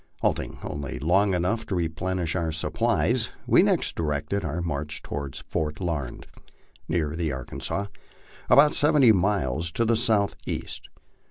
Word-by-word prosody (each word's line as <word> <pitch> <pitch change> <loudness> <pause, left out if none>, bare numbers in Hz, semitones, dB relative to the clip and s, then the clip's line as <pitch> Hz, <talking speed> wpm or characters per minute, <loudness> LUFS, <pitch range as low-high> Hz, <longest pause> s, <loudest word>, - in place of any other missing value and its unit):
Halting - - -1
only 75 -2 -5
long 95 +7 +2
enough 90 +6 0
to 95 - -2
replenish 85 +1 -1
our 85 -3 0
supplies, 80 - +1 0.2
we - - +5
next - - +2
directed 75 +5 -1
our 80 +1 -2
march 75 -3 -4
toward 70 -1 -5
Fort 75 -1 -2
Larned, 80 -9 -3 0.6
near 80 -3 -1
the 85 -2 -1
Arkansas, 65 +9 -3 0.6
about 150 +1 +7
seventy 145 -5 +5
miles 90 - +1
to 115 - +1
the 115 +1 +3
southeast. 110 -3 -1
85 Hz, 135 wpm, -26 LUFS, 75-100 Hz, 0.6 s, about